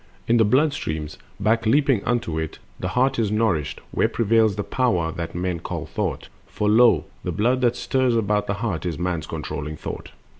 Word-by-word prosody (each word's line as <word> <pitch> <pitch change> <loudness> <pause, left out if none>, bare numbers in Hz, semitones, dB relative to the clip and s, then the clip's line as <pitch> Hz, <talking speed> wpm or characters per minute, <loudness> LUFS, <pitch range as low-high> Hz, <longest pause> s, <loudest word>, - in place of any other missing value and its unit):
In 120 - +4
the 115 - +5
blood 140 +8 +3
streams, 80 - -4 0.2
back 110 +2 +1
leaping 135 -3 +3
unto 115 -10 0
it, 80 -1 -4 0.2
The - - -2
heart 130 0 +1
is 110 -3 +1
nourished, 100 - 0
where - - +2
prevails 110 -2 +2
the 105 - -2
power 100 -12 0
That 85 -2 -5
men 90 -1 -2
call - - -5
thought; - - -3 0.2
for 105 - -2
lo 110 -6 +5 0.2
the - - -2
blood 125 +5 +1
that 120 -1 +3
stirs 130 -2 +1
About 105 -2 +1
the 100 - -1
heart 100 -6 -3
is 85 -4 -3
man's 90 -2 -2
controlling 75 +1 -5
thought. - - -6
105 Hz, 190 wpm, -23 LUFS, 85-120 Hz, 0.2 s, the